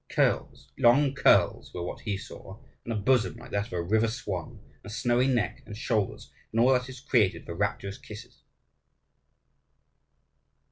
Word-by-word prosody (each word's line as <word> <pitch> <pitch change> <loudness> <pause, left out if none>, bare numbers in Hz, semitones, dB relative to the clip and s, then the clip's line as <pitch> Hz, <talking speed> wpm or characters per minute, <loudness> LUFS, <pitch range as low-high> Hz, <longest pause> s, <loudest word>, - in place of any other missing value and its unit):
Curls, - - 0
long 135 +4 +5
curls, 140 - +3
were 90 - -3
what 90 - -5
he 105 -4 -3
saw; 95 0 -10 0.3
and 115 - -5
a - - -1
bosom 120 +3 +2
like 120 +1 -12
that 100 +1 -1
of 120 - -12
a 85 - -1
river 110 +6 +2
swan, 105 -8 -5 0.2
and - - -37
a - - -8
snowy 120 +3 +1
neck 120 -5 0
and 105 -2 -8
shoulders, 110 -3 -2 0.2
and 115 - 0
all 125 +3 +6
that 125 0 0
is 130 -1 -9
created 110 -8 +1
for 85 - -6
rapturous 100 +1 -2
kisses. 105 +1 -11
110 Hz, 170 wpm, -28 LUFS, 100-125 Hz, 0.3 s, all